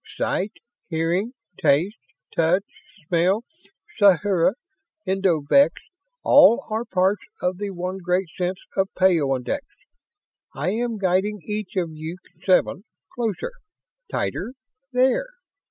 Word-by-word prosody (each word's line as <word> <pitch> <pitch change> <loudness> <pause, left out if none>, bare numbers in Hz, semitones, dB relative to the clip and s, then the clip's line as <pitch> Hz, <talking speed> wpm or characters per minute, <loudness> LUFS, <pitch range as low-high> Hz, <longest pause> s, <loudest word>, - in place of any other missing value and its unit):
Sight, 200 +3 -1 0.4
hearing, 175 +8 0 0.3
taste, 160 +9 +2 0.4
touch, 170 +4 +3 0.4
smell, 180 +6 +2 0.6
sathura, 190 -2 +4 0.5
endovix 190 - +3 0.5
all 280 -5 +6
are 220 +2 -1
parts 190 +1 +1 0.2
of 180 +1 -1
the 205 -1 -3
one 185 0 -4
great 180 +1 0
sense 180 +1 -1 0.2
of 190 0 +1
peyondix. 160 - +2 1.0
I 185 - -1
am 230 +1 -1
guiding 195 +2 0
each 210 -1 -4
of 175 -4 -1
you 160 +3 -6 0.3
seven 185 0 +2 0.3
closer! 235 - -2 0.6
Tighter! 245 - -2 0.4
There! 260 - +2
190 Hz, 105 wpm, -23 LUFS, 175-210 Hz, 1.0 s, all